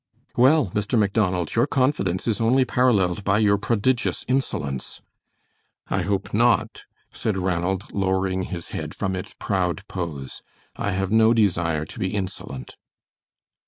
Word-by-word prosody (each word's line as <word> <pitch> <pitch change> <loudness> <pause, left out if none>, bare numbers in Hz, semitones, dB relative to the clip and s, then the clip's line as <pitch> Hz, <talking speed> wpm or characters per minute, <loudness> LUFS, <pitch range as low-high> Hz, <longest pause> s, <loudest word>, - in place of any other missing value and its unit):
"Well, 130 - +4
Mr. 105 +4 0
Macdonald, 100 -5 +1
your 120 +4 +3
confidence 130 -11 0
is 110 -1 0
only 130 +3 +4
paralleled 105 -7 +2
by 100 +1 +2
your 100 -2 +3
prodigious 115 +3 0
insolence." 75 - -2 0.9
"I 95 - 0
hope 100 +2 -2
not," 115 +2 +2 0.3
said 110 -4 -1
Ranald, 90 +1 -1
lowering 95 -1 0
his 85 -3 -6
head - - -5
from 95 -2 -2
its 90 - -6
proud 95 0 -1
pose. 80 -7 -5 0.3
"I 100 - -2
have 95 +1 -1
no 110 +1 +5
desire 85 -7 +1
to - - -10
be 95 +2 -1
insolent." 95 -9 -5
100 Hz, 135 wpm, -24 LUFS, 90-115 Hz, 0.9 s, no